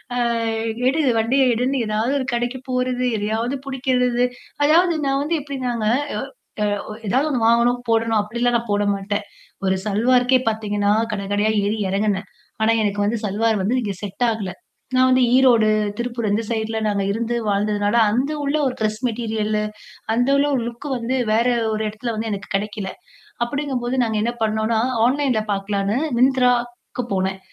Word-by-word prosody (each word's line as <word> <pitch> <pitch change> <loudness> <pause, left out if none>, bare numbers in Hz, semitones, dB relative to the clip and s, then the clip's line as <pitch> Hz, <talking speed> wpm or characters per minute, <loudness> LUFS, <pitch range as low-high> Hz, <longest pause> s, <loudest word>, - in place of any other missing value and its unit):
அ - - -1 0.7
எடு 280 +5 +2 0.2
வண்டிய 245 +5 +2
எடுன்னு 250 +4 0
ஏதாவது 215 +4 0
ஒரு 260 - -2
கடைக்கு 240 +2 -1
போறது 255 0 0
எதையாவது 220 +5 -1
புடிக்கிறது. 250 -2 +1 0.4
அதாவது 340 +4 +4
நான் 275 0 +1
வந்து 330 +3 0
எப்டினாங்க, 255 -5 -3 0.8
அ - - +2
அ - - -3
வ - - -5
ஏதாவது 265 +9 +2
ஒண்ணு 250 -5 0
வாங்கணும் 235 +1 +3
போடணும் 225 -1 +2
அப்டிலாம் 235 +3 0
நான் 235 -1 -7
போட 205 0 +2
மாட்டேன். 205 +1 -3 0.4
ஒரு 190 0 +2
சல்வாருக்கே 245 +5 +3
பாத்தீங்கன்னா 205 -2 0 0.2
கடகடையா 205 +1 0
ஏறி 210 +2 0
எறங்குனேன். 200 0 0 0.4
ஆனா 225 - +4
எனக்கு 205 0 0
வந்து 225 +3 0
சல்வார் 215 +2 +1
வந்து 230 +7 +1
நீங்க 210 -5 -2
செட் 205 +4 -1
ஆகல. 215 -4 -3 0.4
நான் 255 0 +5
வந்து 255 0 +4
ஈரோடு, 245 -4 +5 0.3
திருப்பூர் 235 -2 -2
அந்த 215 +3 +1
சைட்ல 225 -1 -2
நாங்க 200 -1 0
இருந்து 235 +3 -2
வாழ்ந்ததுனால 205 +1 +1 0.2
அந்த 255 +7 0
உள்ள 285 +1 0
ஒரு 255 - -3
கிரெஸ் 215 0 0
மெட்டீரியல்லு, 215 -2 -1 0.5
அந்த 245 +3 +2
உள்ள 280 +1 +3
ஒரு 250 - 0
லுக் 240 +4 -9
வந்து 245 +2 -2 0.2
வேற 230 +2 +3 0.3
ஒரு 215 0 -1
இடத்துல 225 +3 -4
வந்து 220 +1 -3
எனக்கு 200 0 -6
கிடைக்கல. 205 -1 -4 0.6
அப்டிங்கும்போது 260 -1 -2
நாங்க 220 -1 -1
என்ன 235 +1 -1
பண்ணோம்ன்னா, 220 +1 +1 0.3
ஆன்லைன்ல 260 -3 +1
பாக்கலான்னு 200 +2 -1 0.2
Myntraக்கு 250 -1 +1
போனேன். 190 0 -1
230 Hz, 155 wpm, -21 LUFS, 210-250 Hz, 0.8 s, நான்